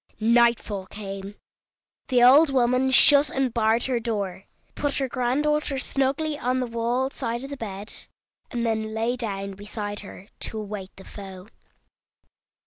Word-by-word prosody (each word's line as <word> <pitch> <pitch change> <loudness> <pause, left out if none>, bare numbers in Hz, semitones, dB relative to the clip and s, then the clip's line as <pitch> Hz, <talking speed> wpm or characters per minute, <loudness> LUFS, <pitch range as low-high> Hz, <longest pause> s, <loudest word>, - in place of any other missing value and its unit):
Nightfall 230 -4 +2
came; 195 0 -7 0.7
the 250 -2 +3
old 280 +5 +7
woman 255 0 +2
shut 285 +3 +7
and 265 -3 -1
barred 225 0 +2
her 255 -2 0
door, 205 -5 -3 0.3
put 290 -1 -1
her 270 - 0
granddaughter 275 +4 0
snugly 280 +3 -1
on 255 +1 0
the 255 - -1
wall 240 +3 -1
side 235 -2 -4
of 275 - -7
the - - -4
bed, 205 -3 -5 0.6
and 240 -1 -2
then 220 -1 -2
lay 230 +3 0
down 200 -5 -4
beside 205 +1 -6
her, 195 -1 -11
to 220 - -3
await 205 -3 -6
the 190 - -14
foe. 190 -1 -10
235 Hz, 145 wpm, -25 LUFS, 205-260 Hz, 0.7 s, old